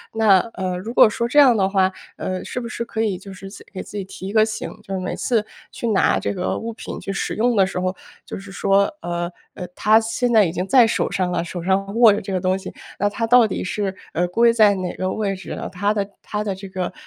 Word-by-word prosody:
那 215 -4 +5 0.2
呃， 185 -1 -2
如 215 +5 -6
果 - - +8
说 235 +2 -2
这 255 - -2
样 270 -5 +7
的 195 -3 +2
话， 190 -1 +2 0.3
呃， 185 0 -3
是 - - -5
不 235 - -5
是 235 0 -4
可 225 -1 -4
以 200 -5 -1
就 195 +1 -11
是 195 +1 -10
自 - - -12
给 190 - -6
自 - - -12
己 200 - -3
提 190 0 -9
一 200 - -5
个 215 -1 +5
醒， 215 -1 -4
就 195 -3 -5
是 - - -2
每 185 - -3
次 225 -4 0 0.3
去 235 - -4
拿 200 -3 +3
这 - - -2
个 185 -2 -2
物 230 0 -5
品 220 - -7
去 195 - -5
使 195 - -2
用 240 +2 +2
的 195 -2 +4
时 185 - -4
候， 185 +1 -1 0.3
就 - - -7
是 195 0 -11
说 195 0 +2 0.2
呃 175 0 -3 0.2
呃， 180 - -7
它 215 +1 +5
现 225 +2 -1
在 220 -3 +6
已 165 - -1
经 180 +2 -3
在 245 +2 +5
手 225 - -1
上 185 -1 -1
了， 170 -1 -1
手 175 +1 -6
上 195 +3 0
握 230 -3 +7
着 - - -2
这 195 - -6
个 185 - 0
东 185 +1 +1
西， 190 - -8 0.2
那 205 - +1
它 225 +3 -2
到 245 0 +6
底 210 - -3
是， 195 +1 -2 0.2
呃， 175 - +1
归 230 +6 +3
在 215 -3 +5
哪 185 -2 -4
个 185 0 -2
位 200 -2 -1
置 190 - -8
呢？ - - -5
它 200 +3 0
的 200 -2 -2
它 210 - -3
的 200 -2 -2
这 195 +1 -9
个 185 -2 -4
195 Hz, 290 characters per minute, -21 LUFS, 185-220 Hz, 0.3 s, 果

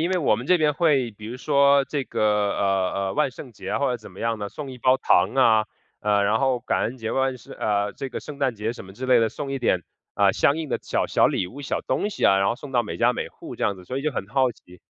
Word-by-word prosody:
因 170 +3 0
为 185 - +1
我 140 -9 +3
们 115 +4 -5
这 180 +1 +4
边 150 -2 +2
会 140 -8 +2
比 105 +1 -13
如 120 +3 -6
说 140 0 +4
这 140 0 -2
个， - - -3 0.3
呃， 95 -2 +1 0.2
呃， - - -4
万 135 - +1
圣 125 -1 -11
节 - - -8
啊 - - 0
或 140 - +1
者 125 - -1
怎 110 - -13
么 - - -15
样 115 -1 -1
的， 100 - -3
送 140 +4 -7
一 - - -9
包 130 +2 +4
糖 95 -6 +3
啊， 110 -5 +4 0.3
呃， 105 -1 +2
然 105 +2 +2
后 130 -2 +2
感 - - -1
恩 120 - -2
节 115 -3 -4
吧， 135 0 +1
是 120 - -14
呃， 105 -1 -1
这 135 - -6
个 125 - -5
圣 145 -2 -9
诞 130 -4 +1
节 105 +2 -2
什 120 - -10
么 95 - -12
之 130 +5 -6
类 125 -2 +5
的， 115 - +2
送 135 +3 -6
一 135 - -2
点， 95 -7 +1 0.3
呃， - - +4
相 140 - +2
应 160 -2 -4
的 - - -2
小 - - -1
小 - - +3
礼 - - -1
物、 135 +9 -10
小 140 - -2
东 210 - -1
西 - - -3
啊， 95 - +5
然 95 0 +2
后 120 - -1
送 140 +1 -10
到 120 -2 +3
每 105 - -6
家 - - +3
每 - - -4
户 - - -10
这 - - -7
样 100 - +1
子， 90 - -13
所 130 +7 -4
以 - - -5
就 155 - 0
很 110 -8 -4
好 130 +4 +2
奇。 90 -6 -17
125 Hz, 320 characters per minute, -24 LUFS, 105-140 Hz, 0.3 s, 类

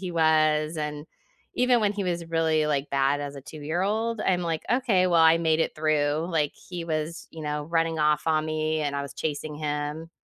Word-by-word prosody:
he 185 -2 -4
was, 155 -1 +2
and 150 0 -4 0.5
even 250 -1 +3
when 205 -2 +2
he 200 -1 -3
was 175 -2 -2
really, 160 -2 +1
like, 145 -1 -1
bad 140 +1 +2
as 145 0 -5
a 140 - -8
two-year-old, 190 - -2
I'm 180 -3 +1
like, 165 -2 -2
"Okay, 230 -7 +3
well, 170 -2 +4
I 160 0 +7
made 160 -1 +2
it - - 0
through" 155 +1 +1
Like, 150 -4 +1
he 175 -2 -8
was, 160 +1 -3
you 160 - -8
know, 150 0 -3
running 165 0 0
off 150 0 +2
on 155 0 +1
me, 155 0 -1
and 145 -1 -2
I 140 - -2
was 140 - -7
chasing 150 0 -4
him. 150 +2 -3
155 Hz, 205 wpm, -26 LUFS, 150-170 Hz, 0.5 s, I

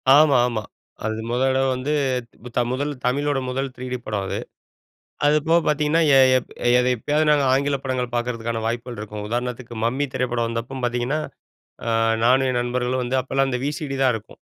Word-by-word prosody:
ஆமா 150 -2 +6
ஆமா. 110 -3 -3 0.4
அது 110 0 -2
முத 120 +1 0
தடவ 135 0 +2
வந்து, 130 +4 -3 0.8
முதல் 145 +3 -1
தமிழோட 140 +2 +1
முதல் 135 +1 -2
3டி 125 0 -4
படம் 105 -2 -2
அது. - - -2 0.9
அது 150 +1 +4
போக 170 +1 +5
பார்த்தீங்கன்னா, 150 +2 +2 0.2
எ - - +8 0.2
எப் - - -10 0.5
எப்பயாவது 150 +7 0
நாங்க 145 -2 +4
ஆங்கில 140 +1 +2
படங்கள் 125 -2 -2
பார்க்கறதுக்கான 115 -1 -2
வாய்ப்புகள் 120 0 -3
இருக்கும் 105 0 -6
உதாரணத்துக்கு 120 0 -3
மம்மி 130 +5 0
திரைப்படம் 120 -2 0
வந்தப்போ 115 +3 -4
பார்த்தீங்கன்னா, 120 +5 0 0.7
ஆ 115 - -1 0.3
நானும் 130 +2 +4
என் 125 - 0
நண்பர்களும் 125 +1 -1
வந்து 125 +2 -1
அப்பலாம் 135 +1 0
அந்த 125 -1 -1
விசிடி 145 -1 -3
தான் 130 -2 +4
இருக்கும். 110 -1 -10
125 Hz, 160 wpm, -23 LUFS, 120-140 Hz, 0.9 s, எ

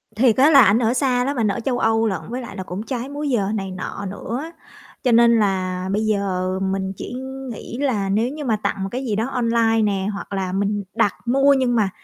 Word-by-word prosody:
Thiệt 230 0 +4
á, 275 +4 +6
là 280 -4 +8
ảnh 215 0 +5
ở 235 -1 +2
xa 255 -2 +1
lắm, 275 0 -2
ảnh 220 - +2
ở 200 - -1
châu 245 +1 -1
Âu 225 0 +2
lận, 190 -4 -2
với 250 +2 -4
lại 235 -5 -9
là 190 - -4
cũng 185 +3 -6
trái 250 +1 -4
múi 290 +1 -3
giờ 220 -7 +1
này 195 -2 -3
nọ 190 +2 -6
nữa. 240 - -5 0.5
Cho 250 - +2
nên 235 0 +5
là 185 -2 -1
bây 210 +2 0
giờ 195 -3 0
mình 190 0 -2
chỉ - - -7 0.4
nghĩ 235 +1 -7
là 240 -8 0
nếu 220 +5 +1
như 295 +1 -6
mà 225 - +2
tặng 195 - -1
một 195 - -3
cái 260 +2 -3
gì 220 -4 -1
đó 220 +3 -1
online 230 -3 +2
nè, 195 -2 0
hoặc 200 - -7
là 190 -2 -2
mình 200 +2 -1
đặt 210 -4 +2
mua 275 +3 +4
nhưng 255 -3 +1
mà, 210 -4 +2
225 Hz, 240 wpm, -21 LUFS, 195-250 Hz, 0.5 s, là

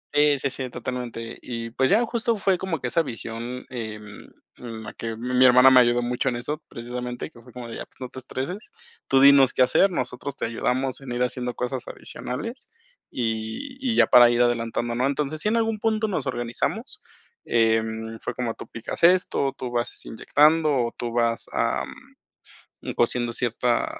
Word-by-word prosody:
y 145 -1 +5
sí, 135 0 -1
sí, 130 -1 -4
totalmente. 120 -2 -6
Y, 115 -2 -5
pues 130 +3 +1
ya, 220 +5 +4
justo 230 -1 -1
fue 195 -2 +1
como 185 -5 -2
que 125 - -3
esa 165 - +2
visión, 120 -2 -6
em, 110 -4 -7 0.3
la 115 -3 -8
que 115 -1 -5
mi 125 +2 +2
hermana 125 +1 +8
me 130 - +8
ayudó 120 0 +3
mucho 125 +2 0
en 120 - -3
eso, 145 +5 -4
precisamente 125 +1 -6
que 120 - -16
fue 125 +1 -16
como 125 0 -8
de 115 - -7
ya, - - -6
pues, - - -21
no 130 -1 -6
te 130 - -8
estreses, 135 - -5 0.4
tú 135 - +4
dinos 140 -2 +7
qué 130 - +4
hacer, 130 +10 +4
nosotros 130 -2 -4
te - - -3
ayudamos 125 +4 -1
en 135 -2 -8
ir 120 +1 0
haciendo 125 -1 -2
cosas 125 0 -3
adicionales, 230 - -6 0.4
y 115 - -3
y 250 -4 0
ya - - +6
para 120 -1 +8
ir 120 0 +2
adelantando, 120 0 -1
¿no?, 125 +3 +1
entonces, 150 +2 -2
si 210 - +1
en 230 - +1
algún 225 -1 0
punto 220 0 +1
nos 180 -9 -2
organizamos, 155 - -3 0.4
em, 110 0 0
fue 120 - -4
como 120 -2 -2
tú - - -10
picas 115 +7 -7
esto, 170 -6 +3
tú 125 -1 -5
vas 120 -1 -3
inyectando 155 +7 +3
o 125 -5 +1
tú 120 -1 -3
vas, 115 -1 0
am, - - 0 0.9
un - - -4
cociendo 120 0 +1
cierta 120 0 +2
125 Hz, 190 wpm, -24 LUFS, 120-140 Hz, 0.9 s, hermana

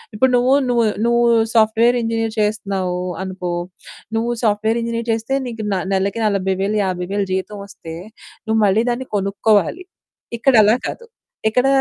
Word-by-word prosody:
ఇప్పుడు 260 +4 +3
నువ్వు, 255 +2 +3 0.2
నువ్వు, 235 -2 +2 0.2
నువ్వు 235 0 +3 0.3
సాఫ్ట్‌వేర్ 225 +2 +4
ఇంజినీర్ 225 -1 -1
చేస్తున్నావు 195 -4 -1 0.2
అనుకో. 185 -2 -4 0.6
నువ్వు 235 +1 0
సాఫ్ట్‌వేర్ 220 +2 +1
ఇంజినీర్ 230 0 -3
చేస్తే 225 +4 -3
నీకు 225 -3 -5
న - - +1 0.2
నెలకి 195 +4 0
40000 195 +1 0
50000 190 +2 -2
జీతం 200 +2 -3
వస్తే 165 -4 -10 0.5
నువ్వు 220 0 +1
మళ్ళీ 205 +4 +3
దాన్ని 255 +2 -4
కొనుక్కోవాలి. 205 - +1 0.5
ఇక్కడలా 230 -3 +5
కాదు. 470 - -7 0.4
ఎక్కడ 250 +4 +2
220 Hz, 130 wpm, -19 LUFS, 195-235 Hz, 0.6 s, ఇక్కడలా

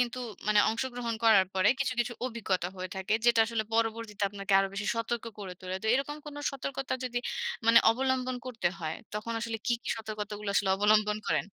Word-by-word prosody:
কিন্তু 245 0 0 0.3
মানে 210 -1 +6
অংশগ্রহণ 235 0 -2
করার 200 -4 +6
পরে 190 +2 +4
কিছু, 265 -2 +1
কিছু 240 +1 -1
অভিজ্ঞতা 195 -7 -1
হয়ে 185 0 -5
থাকে। 190 +2 -2
যেটা 235 -1 +5
আসলে 225 -1 -1
পরবর্তীতে 225 -2 -1
আপনাকে 200 0 -4
আরও 195 0 +2
বেশি 205 +1 -3
সতর্ক 230 0 -2
করে 195 -3 -6
তোলে। 185 0 -4
তো - - -3
এরকম 280 +3 -1
কোনো 290 0 -7
সতর্কতা 270 -1 -4
যদি 245 -1 -1 0.5
মানে 230 0 +8
অবলম্বন 255 +1 0
করতে 225 -7 0
হয়, 160 -1 -3 0.2
তখন 210 +2 -3
আসলে 230 -1 -2
কী, 240 - +3
কী - - -5
সতর্কতাগুলো 210 -1 -5
আসলে 195 -1 +2
অবলম্বন 210 +1 +3
করেন? - - +1
225 Hz, 185 wpm, -30 LUFS, 205-240 Hz, 0.5 s, মানে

